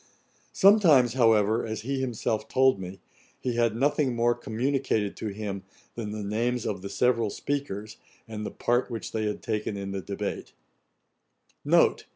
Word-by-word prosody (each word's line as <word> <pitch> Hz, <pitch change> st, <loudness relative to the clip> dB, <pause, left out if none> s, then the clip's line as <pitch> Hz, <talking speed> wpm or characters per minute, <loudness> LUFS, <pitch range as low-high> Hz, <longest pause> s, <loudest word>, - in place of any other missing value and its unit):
Sometimes, 165 Hz, -, +5 dB
however, 110 Hz, -3 st, +3 dB
as 110 Hz, -1 st, -4 dB
he 135 Hz, +3 st, -2 dB
himself 110 Hz, -3 st, -2 dB
told 130 Hz, -5 st, +3 dB
me, 95 Hz, 0 st, -8 dB, 0.4 s
he 125 Hz, -, -2 dB
had 115 Hz, -2 st, +1 dB
nothing 140 Hz, 0 st, +1 dB
more 120 Hz, +1 st, +3 dB
communicated 120 Hz, -3 st, -1 dB
to 110 Hz, -, -4 dB
him 100 Hz, -1 st, -4 dB, 0.3 s
than 115 Hz, -3 st, -5 dB
the 105 Hz, 0 st, -5 dB
names 115 Hz, +4 st, -1 dB
of 95 Hz, -3 st, -3 dB
the 100 Hz, -, -6 dB
several 115 Hz, -2 st, +1 dB
speakers, 110 Hz, -4 st, -4 dB, 0.3 s
and 110 Hz, -1 st, -6 dB
the -, -, -3 dB
part 120 Hz, +2 st, 0 dB
which 115 Hz, -2 st, -5 dB
they 110 Hz, -1 st, -1 dB
had 105 Hz, -, -4 dB
taken 105 Hz, -2 st, -2 dB
in 100 Hz, 0 st, -5 dB
the 95 Hz, 0 st, -3 dB
debate. 100 Hz, +1 st, -5 dB
115 Hz, 155 wpm, -27 LUFS, 105-125 Hz, 0.4 s, Sometimes